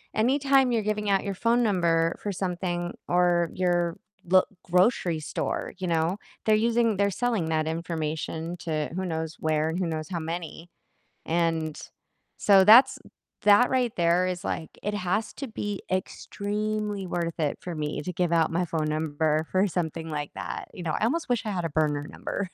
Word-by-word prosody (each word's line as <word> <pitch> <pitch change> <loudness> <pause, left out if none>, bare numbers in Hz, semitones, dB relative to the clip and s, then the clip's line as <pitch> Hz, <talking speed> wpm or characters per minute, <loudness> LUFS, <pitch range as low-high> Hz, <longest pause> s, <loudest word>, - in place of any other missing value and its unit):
Anytime 270 +2 +3
you're 225 - +2
giving 210 0 -1
out 195 - +2
your 200 - -2
phone 235 +4 +2
number 170 -5 +2
for 205 - -2
something 175 -1 -2
or 175 -1 +3
your 175 -2 0 0.3
lo 185 +1 +5 0.2
grocery 180 -2 +2
store, - - -3
you 185 - -2
know, 165 +3 +1 0.3
they're 215 -1 +5
using 230 -1 +2
they're 200 0 +3
selling 225 -4 0
that 155 0 0
information 160 0 -3
to 155 -3 -2
who 190 0 -2
knows 160 -2 -3
where 155 0 +1
and 170 +3 -2
who 180 - 0
knows 155 +1 -4
how 175 - -2
many, 165 +1 -6 0.6
and, 165 -2 0 0.6
so 195 -2 +6
that's 255 +6 +8 0.5
that 210 +4 +6
right 250 -3 0
there 170 +1 +3
is, 180 -1 -3
like, 160 - -4
it 210 +1 -1
has 205 +3 -1
to 275 - -6
be 205 -3 -4
extremely 205 +1 -2
worth 170 -1 -3
it 150 -3 0
for 175 -2 -5
me 150 -1 -3
to 180 - -4
give 175 0 0
out 165 -1 +3
my 175 +2 0
phone 155 -2 -1
number 155 0 0
for 190 +2 +3
something 165 -2 -3
like 145 -1 -3
that. - - -5
You 180 - -8
know, 160 - -1
I - - -2
almost 315 +3 -1
wish 240 -2 0
I 210 - -2
had 180 -3 -2
a - - -1
burner 145 -1 0
number. 190 +2 -4
175 Hz, 180 wpm, -26 LUFS, 160-205 Hz, 0.6 s, that's